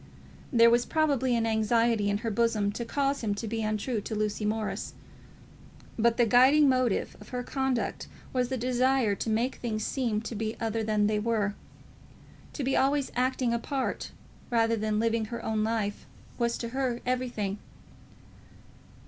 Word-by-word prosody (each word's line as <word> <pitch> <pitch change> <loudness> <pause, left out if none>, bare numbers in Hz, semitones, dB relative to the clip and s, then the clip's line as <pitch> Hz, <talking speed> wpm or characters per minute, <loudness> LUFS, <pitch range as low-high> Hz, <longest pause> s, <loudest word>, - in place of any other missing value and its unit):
There 230 -2 +6
was 240 +1 +4
probably 280 -6 +1
an 230 -1 +1
anxiety 225 -1 +2
in 200 - +1
her 225 - 0
bosom 215 -2 +1
to 225 +3 -4
cause 275 +3 0
him 205 -2 0
to 220 +2 -5
be 225 +1 -2
untrue 215 +2 -1
to 220 - -5
Lucy 210 0 -1
Morris; 215 0 -2 1.0
but 235 0 +2
the 240 - +5
guiding 260 +6 +6
motive 255 -5 +1
of - - -13
her 250 -1 -3
conduct 265 -2 -2 0.3
was 250 -1 0
the 260 - -1
desire 255 -2 +2
to 210 - -3
make 230 +4 0
things 215 -3 -3
seem 235 -6 -1
to 230 - -6
be 220 +1 -4
other 225 0 -1
than 215 -1 +1
they 210 0 +1
were. 210 -2 0 1.0
To 290 - -4
be 265 +1 +1
always 275 +1 +2
acting 255 -1 +1
a 235 - 0
part 270 +2 -3 0.4
rather 230 -1 +2
than 215 -1 -1
living 225 0 +1
her 235 +2 -6
own 220 -1 0
life 215 -2 -2 0.3
was 235 -1 +1
to 235 - -4
her 255 -1 -1
everything. 240 -6 -2
230 Hz, 165 wpm, -28 LUFS, 215-255 Hz, 1.0 s, There